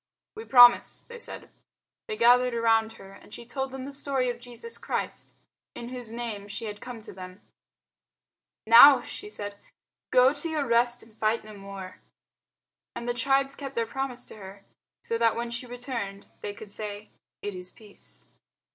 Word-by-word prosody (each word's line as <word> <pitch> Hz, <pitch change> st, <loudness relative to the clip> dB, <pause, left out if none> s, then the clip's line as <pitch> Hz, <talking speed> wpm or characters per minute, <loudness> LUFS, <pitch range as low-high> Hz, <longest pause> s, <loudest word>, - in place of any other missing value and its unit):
"We 440 Hz, +1 st, -9 dB
promise," 245 Hz, -2 st, +6 dB
they 480 Hz, 0 st, -11 dB
said. -, -, -7 dB, 0.6 s
They 435 Hz, -1 st, -4 dB
gathered 250 Hz, -, +5 dB
around 225 Hz, -1 st, +2 dB
her 195 Hz, -2 st, -13 dB
and 200 Hz, -, -16 dB
she 235 Hz, -, -9 dB
told 265 Hz, +2 st, -3 dB
them 260 Hz, 0 st, -7 dB
the 280 Hz, -, -8 dB
story 270 Hz, -3 st, -1 dB
of 240 Hz, -, -9 dB
Jesus 245 Hz, -, -5 dB
Christ -, -, -4 dB, 0.4 s
in 240 Hz, 0 st, -7 dB
whose 245 Hz, -3 st, -7 dB
name 225 Hz, -4 st, -5 dB
she 215 Hz, +3 st, -5 dB
had 210 Hz, -1 st, -7 dB
come 245 Hz, -3 st, -8 dB
to -, -, -10 dB
them. 185 Hz, +1 st, -10 dB, 1.2 s
"Now," 245 Hz, +6 st, +9 dB
she 415 Hz, -, -8 dB
said, 205 Hz, -, -7 dB, 0.5 s
"go 255 Hz, +2 st, +5 dB
to 300 Hz, +3 st, -5 dB
your 305 Hz, -3 st, -1 dB
rest 240 Hz, 0 st, +2 dB
and 225 Hz, -1 st, -19 dB
fight 220 Hz, +1 st, +1 dB
no 215 Hz, -, -10 dB
more." 195 Hz, -2 st, -9 dB, 1.0 s
And 235 Hz, 0 st, -6 dB
the 240 Hz, -, +1 dB
tribes 270 Hz, +3 st, +1 dB
kept 275 Hz, -1 st, -7 dB
their 230 Hz, -, +1 dB
promise 255 Hz, 0 st, -4 dB
to -, -, -12 dB
her, 195 Hz, 0 st, -11 dB, 0.4 s
so 230 Hz, -, -2 dB
that 230 Hz, -1 st, +3 dB
when 235 Hz, 0 st, -3 dB
she 235 Hz, +1 st, -5 dB
returned 235 Hz, -5 st, -5 dB
they 205 Hz, 0 st, -5 dB
could 210 Hz, -1 st, -11 dB
say, 210 Hz, 0 st, -7 dB, 0.3 s
"It 205 Hz, -, -3 dB
is 180 Hz, 0 st, -8 dB
peace." 210 Hz, -2 st, -15 dB
235 Hz, 175 wpm, -27 LUFS, 210-255 Hz, 1.2 s, Now